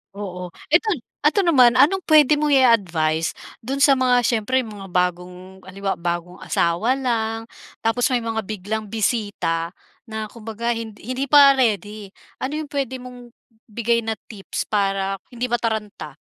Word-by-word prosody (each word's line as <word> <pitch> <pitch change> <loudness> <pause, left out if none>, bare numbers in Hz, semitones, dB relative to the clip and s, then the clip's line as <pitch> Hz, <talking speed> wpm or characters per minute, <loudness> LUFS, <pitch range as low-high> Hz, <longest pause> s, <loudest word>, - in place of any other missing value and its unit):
Oo. 180 -3 -6 0.2
Eto 355 +8 +4 0.4
eto 310 +7 +2
naman 255 -8 +5
anong 295 +9 +4
puwede 300 -1 +5
mong 295 -2 +3
i-advice 170 -11 +2 0.2
dun 275 +4 -1
sa 275 -2 +5
mga 250 -1 +3
siyempre 240 +3 +1
mga 205 -3 -9
bagong 180 +1 -3
halimbawa 195 0 -4
bagong 175 +1 -4
asawa 185 +10 +1
lang 225 -4 -1 0.4
tapos 225 +1 +2
may 245 -2 0
mga 225 -1 -2
biglang 215 +1 -4
bisita 205 -6 -2 0.3
na 220 -1 -5
kumbaga 230 +1 -4
hind 225 -2 -5
hindi 255 +5 -3
pa 285 0 +8
ready. 210 -3 -1 0.3
Ano 275 +3 -3
yung 305 -2 -5
puwede 270 -3 -2
mong 245 -1 -12 0.3
ibigay 235 +1 0
na 225 -1 -3 0.2
tips 200 -3 -5
para 195 -1 0
hindi 245 0 -5
mataranta? 220 -3 -3
225 Hz, 145 wpm, -22 LUFS, 195-255 Hz, 0.4 s, pa